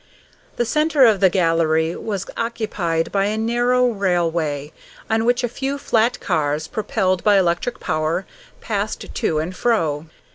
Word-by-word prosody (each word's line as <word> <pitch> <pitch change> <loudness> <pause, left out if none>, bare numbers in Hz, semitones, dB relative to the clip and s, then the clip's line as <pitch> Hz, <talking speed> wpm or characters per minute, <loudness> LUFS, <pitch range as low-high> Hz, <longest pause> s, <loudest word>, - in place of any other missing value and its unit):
The 240 - 0
centre 300 +1 +3
of 215 -4 +4
the 190 -1 +5
gallery 165 -2 +1
was 200 -3 -4
occupied 210 -8 -2
by 195 -1 +1
a 210 +2 -1
narrow 240 +3 +2
railway, 170 - -1 0.4
on 225 0 +2
which 245 +1 +2
a - - +2
few 270 +4 -3
flat 240 -2 +1
cars, 155 -3 -1
propelled 190 -4 -1
by 205 -1 +5
electric 180 +6 0
power, 155 +4 -1 0.4
passed - - -3
to 165 -10 0
and 165 +4 -3
fro. 165 -11 0
195 Hz, 145 wpm, -21 LUFS, 165-235 Hz, 0.4 s, the